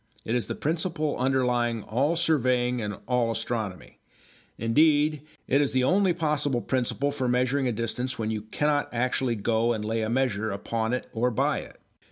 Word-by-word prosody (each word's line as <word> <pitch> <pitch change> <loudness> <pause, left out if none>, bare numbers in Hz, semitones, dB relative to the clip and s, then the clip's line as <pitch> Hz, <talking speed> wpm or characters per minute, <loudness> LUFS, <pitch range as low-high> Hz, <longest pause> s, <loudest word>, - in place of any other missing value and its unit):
It 110 - -1
is 120 -2 0
the - - -3
principle 155 -1 -1
underlying 125 -3 +1
all 140 +9 +1
surveying 125 -7 +1
and 105 -1 -4
all 125 -2 +2
astronomy; 110 -5 -4 0.6
indeed 150 +5 +3 0.3
it 140 +2 +3
is 145 - 0
the 130 -1 +2
only 190 +6 +3
possible 150 -6 0
principle 130 +3 -1
for 130 -3 -2
measuring 125 +2 +1
a - - +1
distance 120 +3 -3
when 110 -1 -2
you 110 -1 -2
cannot 145 +7 0
actually 125 0 0
go 115 +2 +1
and 105 -2 -4
lay 110 +1 -1
a 110 - -1
measure 115 -4 0
upon 110 +3 -2
it 125 - -2
or 120 +2 +1
by 115 - +1
it. - - -12
125 Hz, 175 wpm, -27 LUFS, 115-140 Hz, 0.6 s, indeed